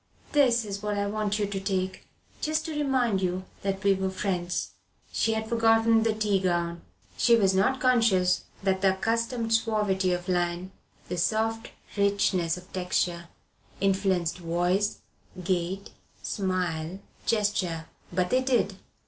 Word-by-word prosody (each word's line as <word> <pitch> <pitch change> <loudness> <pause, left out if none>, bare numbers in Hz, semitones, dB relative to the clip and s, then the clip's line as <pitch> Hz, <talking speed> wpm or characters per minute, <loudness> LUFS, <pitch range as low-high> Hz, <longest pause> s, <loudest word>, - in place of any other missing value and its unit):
"This 245 -6 +4
is 200 -1 -5
what 210 -1 -2
I 200 - 0
want 210 0 -1
you 210 - +1
to 200 -1 -3
take, 190 -1 -2 0.3
just 310 +1 0
to 325 - -4
remind 260 -9 +1
you 185 0 -1 0.2
that 195 -1 -2
we're 190 -1 +2
friends." 185 -2 -2 0.4
She 225 - +1
had 220 0 -2
forgotten 225 0 +4
the 220 -1 +1
tea 210 -2 +1
gown. 170 -2 -1 0.4
She 235 - +5
was 195 -4 +3
not 210 +8 +2
conscious 225 -8 +3 0.2
that 190 -1 +1
the 190 -1 +3
accustomed 230 +2 0
suavity 210 -4 +1
of 175 0 -2
line, 175 0 -1 0.4
the 180 - -3
soft 225 +4 0 0.3
richness 200 -4 +2
of 180 +1 -14
texture 180 -2 -1 0.5
influenced 190 -3 +1
voice, 175 +4 0 0.4
gait, 185 +2 -2 0.3
smile, 180 -3 -2 0.3
gesture. 200 -7 0 0.3
But 180 0 0
they 255 - +4
did. 245 -7 +1
195 Hz, 140 wpm, -27 LUFS, 180-225 Hz, 0.5 s, She